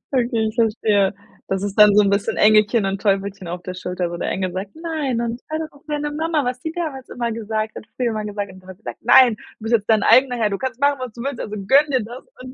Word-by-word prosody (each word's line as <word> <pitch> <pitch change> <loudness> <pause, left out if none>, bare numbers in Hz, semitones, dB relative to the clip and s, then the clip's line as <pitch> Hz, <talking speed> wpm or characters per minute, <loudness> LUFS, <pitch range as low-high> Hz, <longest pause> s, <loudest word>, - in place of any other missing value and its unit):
Okay, 235 -3 +1
ich 215 - -11
verstehe. 210 -4 +2 0.4
Das 195 0 -1
ist 200 -1 -3
dann 210 -1 +8
so 210 - +6
'n 200 - +2
bisschen 200 0 0
Engelchen 215 0 +4
und 195 0 -2
Teufelchen 195 -2 -1
auf 175 +1 -5
der 185 - -5
Schulter, 180 -1 -4
wo 175 - -5
der - - -2
Engel 185 -1 -2
sagt: 190 +2 -6
„Nein 310 -7 -2
und 235 +1 -3
hör 315 - -2
doch 315 -1 -5
auf 285 - -21
deine 295 0 -2
Mama, 315 -1 0
was 250 0 -2
sie 320 - -4
damals 300 -7 -5
immer 235 -1 -3
gesagt 220 -1 -3
hat, - - -8
früher 250 -2 0
immer 215 -1 -3
gesagt 205 -1 -4
hat.“ 185 - -13
Und 185 - -15
der 185 - -15
Teufel 185 - -12
sagt: - - -7
„Nein, 240 0 +6
du - - -18 0.2
bist 225 +2 -1
jetzt 210 -1 -3
dein 220 -2 +4
eigener 250 +2 +5
Herr. 215 -2 +1
Du 195 - -2
kannst 260 0 -4
machen, 285 -1 +3
was 255 -3 -6
du 235 - -9
willst. 275 -3 -4
Also, 210 - -5
gönn 270 +10 +3
dir 260 -4 +1
das.“ 240 +4 -9 0.2
Und 255 0 -9
220 Hz, 280 wpm, -21 LUFS, 200-255 Hz, 0.4 s, dann